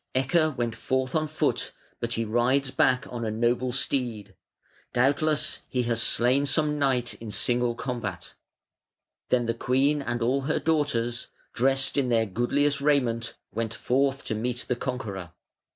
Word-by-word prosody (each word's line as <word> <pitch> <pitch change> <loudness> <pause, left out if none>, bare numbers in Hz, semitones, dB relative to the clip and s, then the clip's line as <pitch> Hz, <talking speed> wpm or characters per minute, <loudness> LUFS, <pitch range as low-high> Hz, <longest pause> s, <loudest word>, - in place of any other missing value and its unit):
Ecke 150 +3 +2
went 120 -2 -1
forth 130 +2 -1
on 155 -1 +1
foot, 155 - -1 0.3
but 120 0 -2
he 115 0 -1
rides 125 +5 +1
back 130 +1 +2
on 120 -1 -3
a 110 - -1
noble 120 +3 +1
steed. 120 -6 -1 0.6
Doubtless 145 +4 +1
he 125 -1 0
has 115 -1 0
slain 130 +5 +3
some 150 0 +2
knight 130 -4 +1
in 115 - -6
single 120 +2 +1
combat". 115 -9 -5 1.0
Then 125 -1 +2
the 115 - 0
queen 135 +5 +1
and 120 -3 -2
all 130 +4 +1
her 145 +3 0
daughters, 130 -7 0 0.3
dressed 135 +3 +2
in 135 -3 +2
their 115 -2 +3
goodliest 140 +7 0
raiment, 125 -6 +1 0.2
went 115 0 -2
forth 135 +3 0
to - - -3
meet 120 +3 -2
the 125 - 0
conqueror. 105 -9 -5
125 Hz, 150 wpm, -26 LUFS, 115-140 Hz, 1.0 s, slain